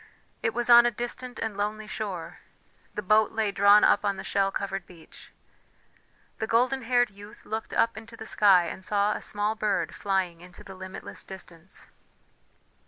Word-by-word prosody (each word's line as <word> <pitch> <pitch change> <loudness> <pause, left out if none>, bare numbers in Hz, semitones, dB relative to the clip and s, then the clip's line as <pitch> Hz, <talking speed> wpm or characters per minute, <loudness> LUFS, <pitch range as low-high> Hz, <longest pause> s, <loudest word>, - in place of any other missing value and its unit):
It 225 - -1
was 240 0 -1
on 240 0 +8
a - - +4
distant 240 +2 -5
and 220 -2 -3
lonely 210 +1 -3
shore; 200 -5 -5 0.6
the 210 - -3
boat 215 +2 +3
lay 220 -2 0
drawn 200 +1 +6
up - - +4
on 200 -1 0
the 190 - -6
shell 195 0 +1
covered 195 -2 -4
beach. 170 -3 -15 1.1
The 220 - -2
golden 255 +4 +2
haired 245 -1 +2
youth 205 +3 -14
looked 220 +1 -4
up 230 -1 +2
into 225 +2 -10
the 220 - -8
sky 195 -5 +5
and 180 +3 -7
saw 205 +2 +1
a - - -5
small 210 +1 -1
bird 215 -2 -1
flying 190 -4 -1
into 180 0 -13
the 195 - -10
limitless 185 0 -8
distance. 180 -2 -8
210 Hz, 170 wpm, -27 LUFS, 195-225 Hz, 1.1 s, on